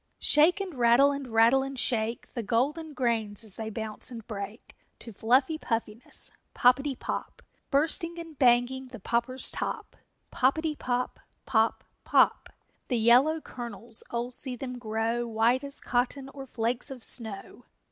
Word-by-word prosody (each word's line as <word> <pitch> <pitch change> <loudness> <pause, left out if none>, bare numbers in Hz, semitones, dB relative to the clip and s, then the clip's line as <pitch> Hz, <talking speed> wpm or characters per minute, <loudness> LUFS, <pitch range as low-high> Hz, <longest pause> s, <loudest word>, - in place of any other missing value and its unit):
_ - - -48
Shake 315 +7 +4
and 390 -3 -4
rattle 245 +2 +5
and 280 -2 -4
rattle 230 +3 +4
and 270 0 -5
shake 230 -2 -1
The 240 - -3
golden 290 +9 -1
grains 225 -4 0
as 215 -3 -3
they 220 +1 -5
bounce 220 +1 -4
and 230 -4 -9
break 205 0 -7 0.2
To 230 - -10
fluffy 260 +9 +2
puffiness 225 -1 -2 0.2
Poppetty 265 +3 +3
pop! - - -5 0.3
Bursting 330 +4 +1
and 330 -2 -8
banging 250 +1 +3
the 250 - -10
popper's 235 +5 -1
top! - - -4 0.4
Poppetty 305 +4 +1
pop! 250 -2 -2 0.3
Pop! 225 -3 +1 0.2
Pop! - - +3 0.4
The 245 - 0
yellow 255 +8 +4
kernels, 230 -3 -5
oh, 240 +1 -3
see 255 0 0
them 250 0 -6
grow 225 +1 -1
White 230 +4 +2
as 280 0 -4
cotton 260 +2 -1
or 275 -1 -9
flakes 240 +2 -1
of 260 -3 -8
snow! 220 +1 -2
245 Hz, 150 wpm, -28 LUFS, 230-270 Hz, 0.4 s, rattle